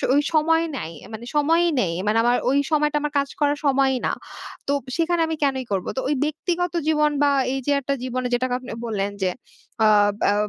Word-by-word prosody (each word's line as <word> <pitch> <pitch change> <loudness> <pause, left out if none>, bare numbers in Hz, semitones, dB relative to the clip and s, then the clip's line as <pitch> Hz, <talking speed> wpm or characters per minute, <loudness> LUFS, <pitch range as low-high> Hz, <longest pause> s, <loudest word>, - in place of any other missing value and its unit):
ওই 290 - +5
সময় 325 +1 +3
নাই। 165 - -5 0.2
মানে 225 +2 -7
সময়ই 330 +4 +3
নেই। 170 -4 -1
মানে 215 +2 +2
আমার 245 +1 +3
ওই 275 - +3
সময়টা, 300 0 +2
আমার 295 0 -3
কাজ 280 0 -2
করার 290 0 +2
সময়ই 270 -1 +3
না। - - +1 0.6
তো 285 - +1 0.2
সেখানে 335 0 +1
আমি 320 - -2
কেনই 265 -2 +1
করবো? 190 -2 -1
তো - - +1
ওই 295 - +2
ব্যক্তিগত 345 +3 -2
জীবন 300 -1 +3
বা 285 - +4 0.2
এই 270 - -1
যে - - +3
একটা 280 +2 -1
জীবনে 255 0 -2
যেটাকে 250 +1 0
আপনি 255 - -9
বললেন 205 -3 -2
যে। 185 - +2 0.6
আ - - +6 0.4
অ্যা 205 - +3
280 Hz, 200 wpm, -23 LUFS, 250-305 Hz, 0.6 s, আ